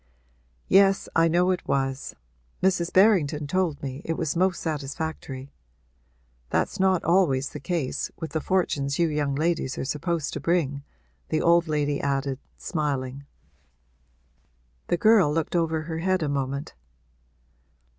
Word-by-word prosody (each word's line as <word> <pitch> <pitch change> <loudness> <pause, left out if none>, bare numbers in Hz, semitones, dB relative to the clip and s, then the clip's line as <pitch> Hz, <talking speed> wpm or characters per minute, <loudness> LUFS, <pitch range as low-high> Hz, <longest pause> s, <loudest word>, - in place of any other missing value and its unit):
'Yes, 195 0 +4
I 165 0 +5
know 175 +3 +3
it 180 - -3
was; 135 0 -1 0.5
Mrs. 180 -2 +2
Berrington 175 -7 +4
told 170 -1 -1
me 135 0 -5
it 165 - -2
was 160 -2 -1
most 180 +1 +1
satisfactory. 145 -2 -5 1.0
That's 195 - -1
not 190 -2 +3
always 155 -7 +2
the - - -8
case 165 -8 -2
with 160 - -6
the 160 - -1
fortunes 145 -7 0
you 170 -1 +2
young 145 -2 -1
ladies 155 -3 -1
are - - -3
supposed 150 +2 -2
to - - -3
bring!' 150 -5 0 0.5
the 155 - +1
old 170 0 +4
lady 145 -2 0
added, 135 -1 -1 0.2
smiling. 140 -4 -3 1.6
The 175 - +1
girl 215 -6 +5
looked 160 +2 -1
over 160 -2 +1
her 160 0 -4
head 185 0 +1
a - - 0
moment. 140 0 -3
160 Hz, 135 wpm, -25 LUFS, 140-175 Hz, 1.6 s, I